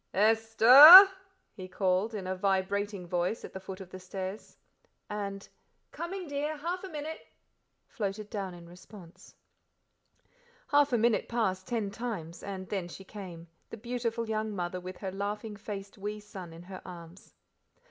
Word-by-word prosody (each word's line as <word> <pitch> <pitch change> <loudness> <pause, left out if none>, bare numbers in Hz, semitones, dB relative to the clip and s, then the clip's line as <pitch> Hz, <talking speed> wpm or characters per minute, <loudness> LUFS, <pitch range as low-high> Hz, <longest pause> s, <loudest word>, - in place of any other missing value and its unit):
"Esther!" 225 - +9 0.5
he 185 -1 -9
called, 190 +4 -1
in 195 -3 -5
a 185 0 -3
vibrating 195 +1 -1
voice 175 +5 -2
at - - -12
the 190 - -6
foot 190 0 -9
of 185 -2 -11
the 185 - -9
stairs. 185 +2 -7 0.5
And 200 -1 -5 0.4
"Coming, 360 +1 -6
dear 295 +2 -3
half 345 +5 -4
a 385 - -7
minute," 310 0 -6 0.7
floated 205 0 -5
down 195 -4 -5
in 170 -1 -13
response. 180 0 -15 1.3
Half 290 -1 +3
a 240 - +2
minute 230 0 +1
passed 190 -6 -1
ten 220 -5 -2
times, 200 -8 -6
and 190 -2 -7
then 190 -4 -3
she 185 +3 -11
came, 185 -4 -10 0.2
the - - -8
beautiful 235 0 -3
young 215 -1 -3
mother 180 0 -4
with 185 0 -9
her 190 -2 -5
laughing 205 +2 -5
faced 200 -1 -8
wee 210 +2 -5
son 190 -4 -10
in 165 +1 -12
her 185 +1 -10
arms. 175 0 -13
200 Hz, 155 wpm, -29 LUFS, 185-225 Hz, 1.3 s, Esther